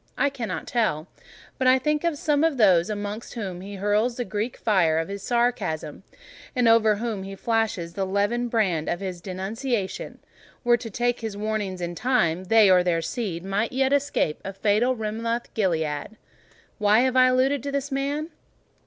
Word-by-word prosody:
I 285 Hz, -, +2 dB
cannot 245 Hz, -5 st, -4 dB
tell; 185 Hz, -10 st, 0 dB, 0.5 s
but 260 Hz, -, +2 dB
I 255 Hz, +1 st, +6 dB
think 300 Hz, +3 st, 0 dB
if 335 Hz, -2 st, +1 dB
some 290 Hz, 0 st, +1 dB
of 325 Hz, -4 st, +2 dB
those 185 Hz, -6 st, +4 dB
amongst 205 Hz, +2 st, -5 dB
whom 190 Hz, -6 st, -5 dB
he 200 Hz, +2 st, -8 dB
hurls 210 Hz, +5 st, +1 dB
the 245 Hz, -, -3 dB
Greek 210 Hz, +4 st, -3 dB
fire 180 Hz, -8 st, +2 dB
of 165 Hz, +3 st, -1 dB
his 200 Hz, 0 st, -5 dB
sarcasm, 235 Hz, -11 st, -1 dB, 0.5 s
and 245 Hz, -2 st, +3 dB
over 225 Hz, -2 st, +5 dB
whom 220 Hz, -2 st, -3 dB
he 195 Hz, +1 st, -7 dB
flashes 215 Hz, -6 st, -1 dB
the 195 Hz, -, -2 dB
levin 205 Hz, +5 st, 0 dB
brand 195 Hz, -9 st, 0 dB
of 175 Hz, -, -1 dB
his 185 Hz, -3 st, -5 dB
denunciation, 195 Hz, +4 st, -3 dB, 0.5 s
were 240 Hz, -1 st, +5 dB
to 230 Hz, -1 st, -6 dB
take 245 Hz, +3 st, 0 dB
his 220 Hz, -3 st, -5 dB
warnings 205 Hz, -3 st, -3 dB
in 175 Hz, 0 st, -3 dB
time—they 205 Hz, -2 st, +3 dB
or 185 Hz, -1 st, +5 dB
their 170 Hz, -2 st, 0 dB
seed 190 Hz, -5 st, -4 dB
might 200 Hz, +5 st, -1 dB
yet 265 Hz, +1 st, +2 dB
escape 285 Hz, -, 0 dB
a 195 Hz, -, -5 dB
fatal 215 Hz, +6 st, +2 dB
Rimoth 230 Hz, +2 st, -3 dB
Gilead. 160 Hz, -2 st, -1 dB, 0.6 s
Why 210 Hz, +2 st, +4 dB
have 260 Hz, 0 st, +1 dB
I 255 Hz, 0 st, +6 dB
alluded 260 Hz, +2 st, +2 dB
to 280 Hz, -, -4 dB
this 280 Hz, 0 st, -2 dB
man? 285 Hz, +4 st, -2 dB
215 Hz, 175 wpm, -25 LUFS, 190-245 Hz, 0.6 s, I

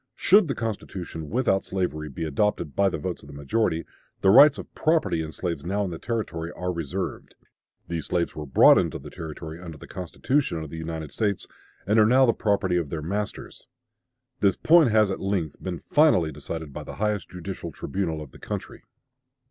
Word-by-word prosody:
"Should 200 Hz, -1 st, +5 dB
the 135 Hz, -, -2 dB
constitution 95 Hz, -8 st, -5 dB
without 110 Hz, -5 st, +1 dB
slavery 75 Hz, -5 st, -3 dB
be 80 Hz, +4 st, -5 dB
adopted 80 Hz, -1 st, 0 dB
by 100 Hz, -1 st, +3 dB
the -, -, -3 dB
votes 90 Hz, +3 st, -4 dB
of -, -, -14 dB
the 70 Hz, -, -11 dB
majority, 80 Hz, +4 st, 0 dB, 0.4 s
the 95 Hz, -, +5 dB
rights 140 Hz, +5 st, +8 dB
of -, -, -9 dB
property 155 Hz, -, +1 dB
in 80 Hz, -1 st, -5 dB
slaves 85 Hz, 0 st, -4 dB
now 100 Hz, +4 st, -1 dB
in 90 Hz, -, -4 dB
the 80 Hz, -, -6 dB
Territory 85 Hz, -8 st, -3 dB
are 90 Hz, 0 st, -3 dB
reserved.... 85 Hz, -5 st, -4 dB, 0.5 s
These 85 Hz, -3 st, -4 dB
slaves 85 Hz, -2 st, -1 dB
were 75 Hz, -1 st, -6 dB
brought 65 Hz, -, +7 dB
into -, -, -1 dB
the -, -, -11 dB
Territory 80 Hz, 0 st, -7 dB
under 85 Hz, -3 st, -8 dB
the -, -, -11 dB
Constitution 95 Hz, -, -1 dB
of 75 Hz, -, -9 dB
the 80 Hz, -, -6 dB
United 80 Hz, -2 st, -5 dB
States 100 Hz, 0 st, -1 dB, 0.4 s
and 105 Hz, +3 st, +3 dB
are 105 Hz, -, +6 dB
now 130 Hz, +3 st, +6 dB
the 115 Hz, -, +3 dB
property 100 Hz, -4 st, +1 dB
of 85 Hz, -5 st, -1 dB
their 80 Hz, -1 st, -4 dB
masters. 100 Hz, +5 st, -5 dB, 0.7 s
This 100 Hz, -2 st, +3 dB
point 165 Hz, -4 st, +5 dB
has 110 Hz, -2 st, +4 dB
at -, -, -3 dB
length 95 Hz, -6 st, -2 dB
been 90 Hz, -3 st, -5 dB
finally 145 Hz, -, +4 dB
decided 75 Hz, +1 st, -6 dB
by -, -, -6 dB
the -, -, -8 dB
highest 105 Hz, -2 st, -1 dB
judicial 90 Hz, -1 st, -6 dB
tribunal 80 Hz, -1 st, -3 dB
of 70 Hz, -, -13 dB
the -, -, -15 dB
country." -, -, -6 dB
90 Hz, 195 wpm, -25 LUFS, 80-105 Hz, 0.7 s, rights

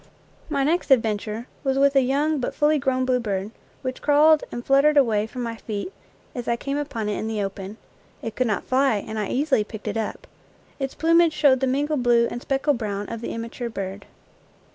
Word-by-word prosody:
My 280 Hz, -3 st, 0 dB
next 325 Hz, +4 st, 0 dB
adventure 220 Hz, -2 st, +1 dB, 0.2 s
was 270 Hz, -1 st, 0 dB
with 280 Hz, 0 st, +4 dB
a 270 Hz, -, +6 dB
young 285 Hz, +4 st, +1 dB
but 250 Hz, -, -3 dB
fully 300 Hz, 0 st, +3 dB
grown 260 Hz, -1 st, 0 dB
bluebird, 215 Hz, -6 st, -1 dB, 0.3 s
which 255 Hz, 0 st, -4 dB
crawled 300 Hz, +1 st, +5 dB
and 240 Hz, -, -6 dB
fluttered 280 Hz, +2 st, +4 dB
away 220 Hz, -6 st, +3 dB
from 250 Hz, +2 st, -6 dB
my 230 Hz, -1 st, -4 dB
feet 220 Hz, -, -5 dB, 0.4 s
as 245 Hz, -2 st, -6 dB
I 235 Hz, -, +2 dB
came 275 Hz, +4 st, -3 dB
upon 235 Hz, -7 st, -3 dB
it 210 Hz, -, -2 dB
hi 220 Hz, -, -3 dB
the 215 Hz, -2 st, -1 dB
open. 195 Hz, +1 st, -6 dB, 0.5 s
It 225 Hz, -1 st, -5 dB
could 255 Hz, +1 st, +1 dB
not 205 Hz, -4 st, -1 dB
fly, 265 Hz, -2 st, +2 dB
and 215 Hz, +2 st, -4 dB
I 210 Hz, -, -1 dB
easily 270 Hz, -3 st, +1 dB
picked 215 Hz, 0 st, -9 dB
it -, -, -2 dB
up. 220 Hz, -2 st, -4 dB, 0.5 s
Its 270 Hz, -1 st, -3 dB
plumage 330 Hz, 0 st, +4 dB
showed 280 Hz, -4 st, +4 dB
the 265 Hz, -, +1 dB
mingled 285 Hz, +2 st, 0 dB
blue 235 Hz, -1 st, +4 dB
and 240 Hz, -, -5 dB
speckled 270 Hz, -1 st, 0 dB
brown 205 Hz, -2 st, -3 dB
of 230 Hz, -1 st, -5 dB
the -, -, -4 dB
immature 230 Hz, +1 st, -5 dB
bird. 195 Hz, -2 st, -6 dB
250 Hz, 205 wpm, -24 LUFS, 220-280 Hz, 0.5 s, a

